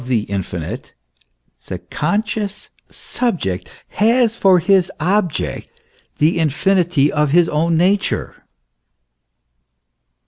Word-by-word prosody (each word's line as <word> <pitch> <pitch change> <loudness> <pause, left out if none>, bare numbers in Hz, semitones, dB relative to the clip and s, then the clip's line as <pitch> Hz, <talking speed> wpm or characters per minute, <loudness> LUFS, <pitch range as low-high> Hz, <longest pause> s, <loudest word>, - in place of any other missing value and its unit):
3 - - -12
the 120 -4 +2
infinite, 90 -4 -5 0.7
the - - -4
conscious 205 +4 -3 0.2
subject 160 - -3 0.2
has 230 +1 +2
for 195 -5 +4
his 185 +1 +2
object 175 -3 -1 0.5
the 160 +3 +2
infinity 165 -1 +2
of 150 -1 +1
his 170 +3 +4
own 165 +2 +1
nature. 195 +4 0
175 Hz, 95 wpm, -18 LUFS, 150-200 Hz, 0.7 s, for